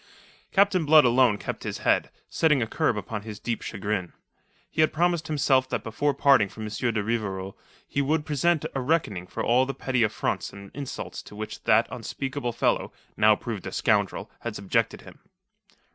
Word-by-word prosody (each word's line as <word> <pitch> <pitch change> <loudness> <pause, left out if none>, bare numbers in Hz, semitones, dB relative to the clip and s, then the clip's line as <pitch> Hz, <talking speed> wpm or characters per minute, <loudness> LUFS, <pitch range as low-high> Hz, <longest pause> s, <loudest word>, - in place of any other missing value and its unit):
Captain 195 -3 +3
Blood 155 -1 +7
alone 120 -3 +4
kept - - -5
his - - -4
head, - - +3 0.2
setting 150 -4 +2
a 115 - +1
curb 110 0 0
upon 105 +1 -4
his 105 -1 -8
deep 115 0 -3
chagrin. 100 -3 -3 0.5
He 155 - -1
had 155 - +4
promised 170 0 +1
himself 135 -4 +2
that - - -2
before 140 +6 -1
parting 135 -8 +4
from 110 +2 -9
M. 105 - -4
de 110 -1 -1
Rivarol 100 -4 -3 0.3
he 140 - -1
would 150 +2 0
present 155 +2 +1
a 135 - -2
reckoning 125 - 0
for - - -4
all 125 +2 +3
the 135 - -4
petty 130 -2 -1
affronts 110 - -1
and 100 0 -11
insults 140 -2 -6
to - - -13
which 110 +1 -7
that - - +4
unspeakable 135 -2 -4
fellow 115 - 0 0.2
now - - +5
proved - - -6
a - - -5
scoundrel - - 0
had 115 -2 -5
subjected 100 -2 0
him. - - -14
125 Hz, 180 wpm, -26 LUFS, 105-145 Hz, 0.5 s, Blood